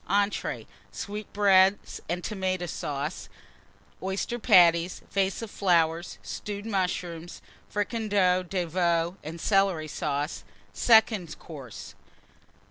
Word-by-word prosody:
Entrées 200 +1 0 0.3
Sweetbreads 200 -2 +2
and 175 +1 -2
Tomata 185 -3 -2
Sauce. 145 0 -4 0.7
Oyster 190 +5 -2
Patties. 170 -3 +4
Vase 195 +2 0
of 220 - -7 0.7
Stewed 205 0 -6
Mushrooms. 180 -4 -3 0.3
Flowers. - - -28
Fricandeau 205 -4 +1
de 180 0 -2
Veau 170 +1 0
and 160 +3 -7
Celery 195 -5 +2
Sauce. 145 +1 -3 0.3
_Second 220 -6 +3
Course. 135 -9 -10
185 Hz, 95 wpm, -27 LUFS, 170-200 Hz, 0.7 s, Patties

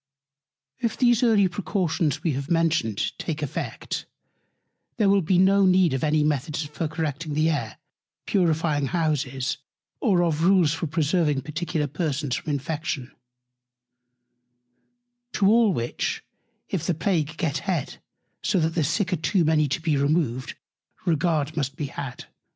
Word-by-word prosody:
If 230 - -1
these 240 -2 +4
early 220 -5 +4
Precautions, 180 -4 -1
we 165 - +1
have 140 +2 -4
mentioned, 160 - +1
take 155 -2 -3
Effect, 145 - -4 0.9
there 210 - +3
will 200 0 +4
be 175 +2 +2
no 195 +2 +5
need 185 -4 +4
of 135 - -2
any 155 0 +2
Methods 150 +1 -1
for 150 +2 -3
Correcting 155 -1 -3
the 155 +2 +3
Air, 125 -8 -3 0.5
Purifying 160 -6 +1
Houses, 145 -4 -1 0.4
or 190 - +3
of 160 -2 0
Rules 180 -4 +4
for 165 0 -3
preserving 155 -2 +1
particular 155 +1 -2
Persons 145 -3 -2
from - - -5
Infection: 145 -2 -3 2.2
To 200 - +1
all 220 +1 +5
which, 120 -8 -2 0.4
if 175 -5 -2
the 175 - +1
Plague 160 -3 -1
get 150 -5 -1
head, 170 -7 -2 0.4
so 190 0 +1
that 160 0 +1
the 165 - +1
Sick 170 +5 0
are - - +1
too 170 +2 +1
many 155 -1 +3
to 140 - -1
be 160 -3 0
removed, 140 -3 0 0.5
Regard 155 -2 +1
must 140 -3 -2
be 150 - -3
had. 135 -2 -7
160 Hz, 145 wpm, -25 LUFS, 145-175 Hz, 2.2 s, no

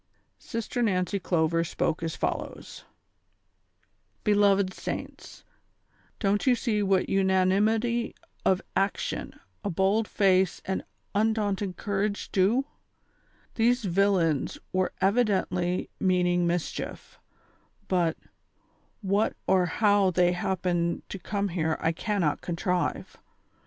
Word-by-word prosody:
Sister 230 +2 -4
Nancy 195 -2 +1
Clover 165 -2 +1
spoke 165 0 -1
as 165 -1 -3
follows: - - -4 1.4
"Beloved 200 -2 +3
saints, - - -7 0.7
don't 205 +3 0
you 250 - +6
see 220 -3 0
what 195 -2 +2
imanimity 205 +5 +2 0.3
of 190 -1 +2
action, 195 +1 -2 0.2
a - - -1
bold 195 +4 +1
face 190 -3 +2
and 190 - -2 0.3
undaunted 205 -3 0
courage 205 0 -2
do 205 +8 +3
V - - -35 0.9
These 245 +2 +2
villains 180 -5 +1 0.2
were 185 0 +1
evidently 190 -4 +1
meaning 180 -2 +2
mischief; 170 -1 -4 0.7
but, 175 -3 +1 0.8
what 200 +2 +1
or 185 -1 +3
hoAV 205 -3 +3
they 180 -1 +4
liappened 175 -2 -1
to 195 - -6
come 200 +1 -2
here 160 -3 -1
I 160 - +1
cannot 175 -3 -1
contrive. 175 +1 -2
190 Hz, 105 wpm, -27 LUFS, 180-205 Hz, 1.4 s, you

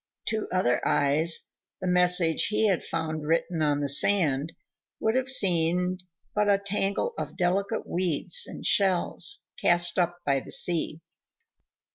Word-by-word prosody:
To 220 -1 -2
other 155 -10 0
eyes 150 +4 +2 0.4
the 185 - -6
message 180 -2 +3
he 215 +1 0
had 190 -4 0
found 155 -2 -4
written 165 +1 -1
on 145 -1 0
the 145 - -1
sand 150 -1 +1 0.5
would 220 - 0
have 260 +1 -1
seemed 180 -4 +2 0.3
but 210 0 0
a 200 - +4
tangle 200 - -2
of - - -6
delicate 195 +4 -1
weeds 175 -1 0
and - - -9
shells 185 -3 +1 0.2
cast 175 +1 +2
up 175 0 0
by 140 -1 +1
the - - -12
sea. 165 -2 +2
175 Hz, 140 wpm, -26 LUFS, 160-195 Hz, 0.5 s, a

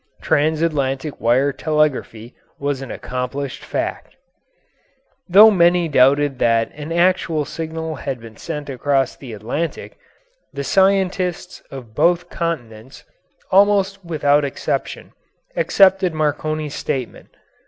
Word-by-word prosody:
Transatlantic 150 -2 0
wireless 130 +5 +2
telegraphy 145 -7 -1 0.2
was 140 -1 -2
an 135 - -7
accomplished 125 +2 -5
fact. - - -4 1.1
Though 210 +5 +8
many 175 -2 +3
doubted 140 -1 +3
that 115 -1 +2
an 150 +2 -8
actual 170 -3 +1
signal 160 0 -5
had 135 -2 -4
been 115 -1 -12
sent 150 +2 -6
across 135 0 0
the 130 -4 -11
Atlantic, 120 +10 -5 0.5
the 140 0 -5
scientists 190 0 0
of 125 -5 -10
both 175 +6 +1
continents, 130 -7 -5 0.5
almost 195 0 +3
without 150 -3 +2
exception, 140 - -4 0.4
accepted 190 -3 +3
Marconi's 155 0 -2
statement. 130 -5 -4
150 Hz, 105 wpm, -20 LUFS, 135-170 Hz, 1.1 s, Though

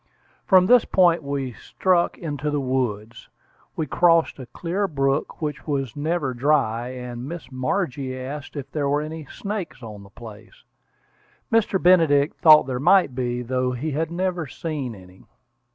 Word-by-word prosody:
From 185 -2 +6
this 245 +3 +6
point 175 -3 +3
we 140 -3 -3
struck 180 - 0
into 150 -3 -4
the 145 0 -1
woods. 120 -5 -3 0.5
We 160 - -2
crossed 165 +1 +2
a 130 - -8
clear 180 +10 -2
brook 135 +1 -1
which 150 0 -4
was 135 -5 -2
never 150 -2 -1
dry; 125 -3 +1
and 125 0 -7
Miss 170 -4 -8
Margie 130 -1 -2
asked 145 +4 -7
if 140 -2 -7
there 145 -2 -1
were 145 +1 +1
any 155 0 -7
snakes 200 - -6
on 105 -3 -9
the 100 - -14
place. 110 -1 -13 0.9
Mr. 225 -4 +2
Benedict 160 -6 +4
thought 155 -4 +8
there 130 -2 -3
might 180 -1 +4
be, 125 -1 -2
though 125 +1 -1
he 145 +6 -3
had 155 +3 -1
never 175 -2 -2
seen 135 -3 -5
any. 95 -1 -16
145 Hz, 155 wpm, -23 LUFS, 125-165 Hz, 0.9 s, thought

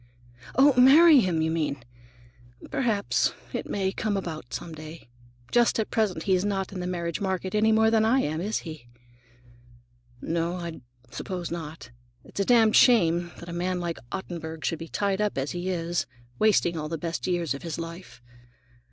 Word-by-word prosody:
Oh, 275 +2 +6
marry 300 +3 +8
him, 175 -7 +1
you 160 - 0
mean! 155 -3 -1 0.9
Perhaps 220 -6 +1 0.2
it - - -4
may 190 -1 -1
come 210 0 -2
about, 155 -9 -6
some 165 - -6
day. 155 0 -10 0.4
Just 240 -1 +3
at 220 - -2
present 195 -7 0
he's 185 -2 +2
not 195 -2 -2
in 185 - -5
the 180 - -3
marriage 170 -1 -3
market 190 -1 -2
any 215 +1 +3
more 220 0 +4
than 220 -1 +3
I 245 +5 +3
am, 155 +2 -2
is 210 +4 -1
he?" 155 -7 -9 1.3
"No, 170 +4 -2
I 170 -4 -6 0.3
suppose 180 +2 -5
not. 160 -5 -7 0.3
It's - - -10
a 200 - +2
damned 225 -2 +5
shame 175 -8 +4
that 170 - -11
a 170 - -6
man 180 +1 -1
like 170 -1 -4
Ottenburg 160 -4 -6
should 165 - -1
be 165 - -7
tied 200 +3 -1
up 210 -6 -1
as 135 +1 -2
he 175 +1 -3
is, 175 -1 -2 0.3
wasting 205 -5 +3
all 155 -1 -4
the 165 - -3
best 165 +3 -4
years 175 -4 0
of 140 - -7
his 165 -2 -5
life. 165 -5 -9
175 Hz, 180 wpm, -26 LUFS, 165-205 Hz, 1.3 s, marry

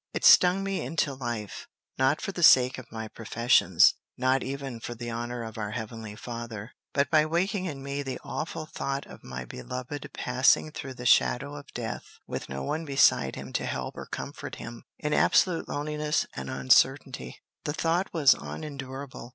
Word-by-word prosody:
It - - -1
stung 180 +2 +7
me 195 -1 -2
into 145 +1 -1
life, 120 -6 -5 0.3
not 135 +3 +3
for - - -3
the 180 - -5
sake 130 -4 +7
of 130 - -12
my 110 -1 -5
professions, 115 +2 +4 0.2
not 130 +1 +2
even 135 -3 -5
for 120 +1 -6
the 120 0 -5
honor 120 +1 -4
of 110 0 -7
our 105 -1 -2
heavenly 110 -2 -6
Father, 115 -1 -7 0.2
but 140 0 +1
by 155 -1 +6
waking 185 +4 0
in 140 -6 -5
me 140 +1 -3
the 135 -2 -4
awful 155 0 -4
thought 140 -2 -3
of - - -13
my 65 0 -6
beloved 125 - -6
passing 130 +4 +3
through 135 -3 -7
the 125 - -8
shadow 140 +3 +3
of 145 -1 -10
death 115 -3 -5
with - - -5
no 65 0 -4
one 155 - -2
beside 135 - +3
him - - -8
to - - -1
help - - -4
or - - -7
comfort - - -6
him, 115 0 -9
in 150 0 -2
absolute 180 -3 +3
loneliness 150 +1 -1
and 65 -1 -5
uncertainty. 65 -1 +2 0.3
The 145 - -1
thought 170 +4 0
was 150 -5 +6
unendurable. 135 -4 -7
130 Hz, 175 wpm, -28 LUFS, 115-150 Hz, 0.3 s, stung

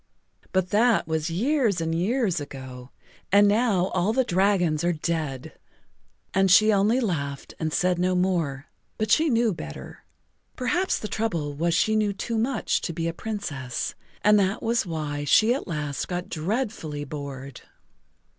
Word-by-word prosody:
But 185 -1 0
that 225 -1 +3
was 160 0 -1
years 225 - +1
and 165 0 -1
years 190 - 0
ago, 130 -3 -9 0.4
and 205 +1 +6
now 205 -4 +2
all 185 +4 0
the 260 +2 +3
dragons 180 -6 +1
are 175 - +2
dead." 155 -5 -3 0.8
And 195 0 +3
she 215 +4 +6
only 205 +5 +3
laughed 140 - -3
and 160 -1 -1
said 180 +2 +1
no 185 +1 +1
more, 170 -7 0 0.3
but 215 0 -1
she 315 +6 +4
knew 230 -4 +2
better. 75 - -9 0.5
Perhaps 350 +10 0
the 215 - -5
trouble 170 -11 -2
was 165 +3 0
she 220 +5 +2
knew 210 -2 +1
too 225 +3 -3
much 240 +1 0
to 170 - -3
be 165 +1 -2
a 165 - -2
Princess, 150 - -4 0.3
and 210 0 +6
that 195 +1 0
was 230 -3 +1
why 150 -3 -3
she 215 - +4
at 275 - -4
last 150 -4 -3
got 180 +1 -4
dreadfully 170 - -3
bored. 140 -3 -7
180 Hz, 155 wpm, -25 LUFS, 155-215 Hz, 0.8 s, and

